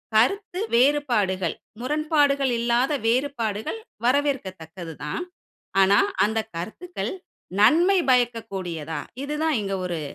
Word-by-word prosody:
கருத்து 365 - +2 0.2
வேறுபாடுகள், 235 - +2 0.3
முரண்பாடுகள் 285 -2 +2
இல்லாத 240 +4 +2
வேறுபாடுகள் 235 - -1 0.3
வரவேற்கத்தக்கது 190 - -1
தான். 150 - -3 0.6
ஆனா, 195 +2 +5 0.3
அந்த 220 +1 0 0.2
கருத்துக்கள் 345 - -5 0.5
நன்மை 350 - +5
பயக்கக்கூடியதா? 195 -10 -1 0.3
இது 295 - -4
தான் 310 -6 +2
இங்க 195 0 -2
ஒரு 170 -2 -3
240 Hz, 95 wpm, -24 LUFS, 195-290 Hz, 0.6 s, ஆனா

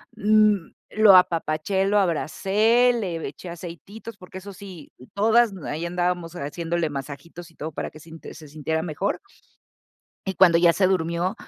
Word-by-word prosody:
N 210 -3 +3 0.2
lo 215 -3 +7
apapaché, 170 +2 +1
lo 205 +1 +2
abracé, 210 +7 +2
le 185 -8 -3
eché 180 - -9
aceititos, 175 +6 -9
porque 185 -1 -12
eso 195 +1 -9
sí, 185 -5 -11 0.2
todas 225 +3 +3
m 185 -6 -8
ahí 155 +3 -3
andábamos 175 -1 -2
haciéndole 165 +3 -2
masajitos 145 +4 -8
y - - -26
todo 155 +1 -6
para - - -4
que 155 - -14
sinte 160 +1 -12
se 155 - -12
sintiera 155 +2 -3
mejor. 175 +4 -2 1.1
Y 190 - -2
cuando 175 -2 +5
ya 170 0 +5
se 190 +2 +2
durmió, 175 +1 0
175 Hz, 155 wpm, -24 LUFS, 160-200 Hz, 1.1 s, lo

